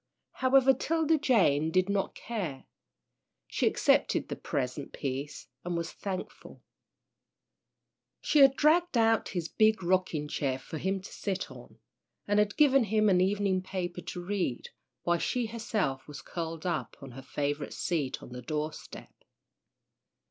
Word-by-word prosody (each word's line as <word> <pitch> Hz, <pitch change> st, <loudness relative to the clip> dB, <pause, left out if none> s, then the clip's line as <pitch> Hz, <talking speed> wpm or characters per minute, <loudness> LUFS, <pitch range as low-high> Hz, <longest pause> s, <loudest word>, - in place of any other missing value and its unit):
However, 265 Hz, 0 st, +4 dB
'Tilda 320 Hz, +3 st, +1 dB
Jane 165 Hz, -, +3 dB
did 185 Hz, +3 st, +2 dB
not 200 Hz, -1 st, -1 dB
care. 185 Hz, -, -5 dB, 0.8 s
She -, -, 0 dB
accepted -, -, +2 dB
the -, -, -3 dB
present 135 Hz, +1 st, -3 dB
peace 140 Hz, +1 st, -4 dB, 0.2 s
and 175 Hz, -1 st, -2 dB
was 170 Hz, 0 st, -3 dB
thankful. 190 Hz, -2 st, -7 dB, 1.6 s
She 300 Hz, -, +2 dB
had 270 Hz, -1 st, +7 dB
dragged 325 Hz, 0 st, +3 dB
out 225 Hz, -1 st, +3 dB
his 170 Hz, -2 st, -1 dB
big 215 Hz, -1 st, +2 dB
rocking 175 Hz, -4 st, +1 dB
chair 135 Hz, -3 st, -1 dB
for 150 Hz, +4 st, -7 dB
him 190 Hz, +2 st, -1 dB
to 190 Hz, -, -11 dB
sit 195 Hz, -2 st, -3 dB
on, -, -, -13 dB, 0.5 s
and 205 Hz, 0 st, +3 dB
had 210 Hz, 0 st, +1 dB
given 275 Hz, -4 st, +5 dB
him 215 Hz, 0 st, +3 dB
an 180 Hz, -2 st, +4 dB
evening 195 Hz, -1 st, +1 dB
paper 180 Hz, -2 st, -4 dB
to 175 Hz, +1 st, -7 dB
read, 180 Hz, -10 st, -2 dB, 0.3 s
while 175 Hz, 0 st, +2 dB
she 245 Hz, +6 st, 0 dB
herself 215 Hz, -, -2 dB
was 140 Hz, -2 st, -9 dB
curled 165 Hz, +1 st, -5 dB
up 170 Hz, -3 st, -2 dB
on 135 Hz, -2 st, -10 dB
her 130 Hz, +2 st, -9 dB
favourite 145 Hz, +2 st, -3 dB
seat 150 Hz, -7 st, -2 dB
on -, -, -11 dB
the 125 Hz, 0 st, -7 dB
door 150 Hz, +4 st, -2 dB
step. -, -, -11 dB
185 Hz, 150 wpm, -30 LUFS, 150-220 Hz, 1.6 s, had